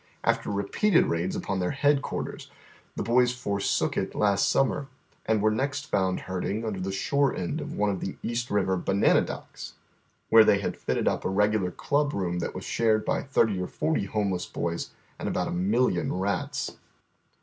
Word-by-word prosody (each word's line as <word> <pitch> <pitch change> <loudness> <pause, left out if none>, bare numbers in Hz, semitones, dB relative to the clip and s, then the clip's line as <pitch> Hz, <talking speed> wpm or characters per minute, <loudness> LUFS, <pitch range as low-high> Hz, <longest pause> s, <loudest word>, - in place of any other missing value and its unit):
After - - +1
repeated 105 - +2
raids 85 +3 -1
upon 100 -1 -2
their 90 - 0
headquarters, 145 -1 0 0.5
the - - -2
boys 120 +3 +3
forsook 100 -5 -1
it - - -2
last 100 -1 +2
summer, 135 +1 +1 0.4
and 110 -2 +2
were 110 - +4
next 140 +6 -2
fonnd 95 -2 +1
herding 95 +4 -3
under 105 -4 -3
the 95 +1 -3
shore 140 +8 +1
end 90 - -3
of - - -6
one 105 0 +1
of 95 - -3
the 95 - -4
East 120 +1 -2
Kiver 95 -2 +1
banana 95 +3 +3
docks, - - -7 0.6
where 110 0 +8
tliey 100 -2 +4
had 100 - -3
fitted - - -2
np - - 0
a 95 +2 -1
I'eg 105 - +3
ular 90 -5 -1
club 145 0 0
room 90 -3 -1
that 85 - -4
was - - -6
shared 110 -2 +1
by - - 0
thirty 110 -8 +1
or 90 - -2
forty 155 -10 -1
home 100 0 -1
less 90 -1 -3
boys 85 0 -3 0.3
and - - -2
about - - -1
a - - -3
million 95 +1 +1
rats. 95 +2 -2
100 Hz, 185 wpm, -27 LUFS, 95-120 Hz, 0.6 s, where